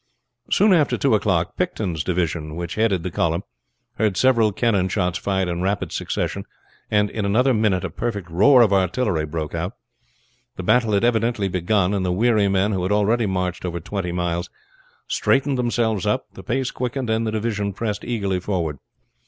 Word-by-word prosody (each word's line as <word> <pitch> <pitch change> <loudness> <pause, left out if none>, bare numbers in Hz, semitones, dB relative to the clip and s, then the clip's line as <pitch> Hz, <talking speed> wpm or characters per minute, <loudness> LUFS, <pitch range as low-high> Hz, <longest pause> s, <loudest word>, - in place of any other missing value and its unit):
Soon 205 -1 +4
after 155 -5 +3
two 135 - +2
o'clock 95 -5 +1
Picton's 100 - -2
division, 85 -3 -2
which 85 0 -4
headed 105 -6 +1
the 90 - -3
column, 85 +2 0 0.6
heard 105 -4 +1
several 115 -3 +4
cannon 100 -3 +1
shots 90 -2 -1
fired 95 -2 0
in 85 0 -2
rapid 95 +2 -1
succession, - - -3 0.5
and 105 -1 +2
in 110 - -3
another 120 +7 +3
minute 105 -5 +1
a - - -3
perfect 100 -7 -3
roar 120 +9 +6
of 105 -3 +2
artillery 90 -4 +1
broke 75 0 -4
out. 85 +5 -3 0.8
The 90 - -6
battle 115 +2 +3
had 100 - +2
evidently 115 -3 +1
begun; 90 +2 +1
and 100 -2 0
the 90 - 0
weary 105 +1 +3
men, 100 +2 +1
who 95 -3 -1
had 90 +2 -1
already 105 +2 +2
marched 90 -2 -2
over 85 -1 -3
twenty 90 +1 -4
miles, 85 0 -2 0.6
straightened 135 -1 +1
themselves 115 -5 0
up, - - 0
the - - -10
pace 130 +2 -2
quickened, 125 -1 -3
and 110 0 0
the - - -1
division 105 -2 -2
pressed 105 +1 -3
eagerly 100 -6 -1
forward. 85 -6 -2
100 Hz, 175 wpm, -22 LUFS, 90-115 Hz, 0.8 s, roar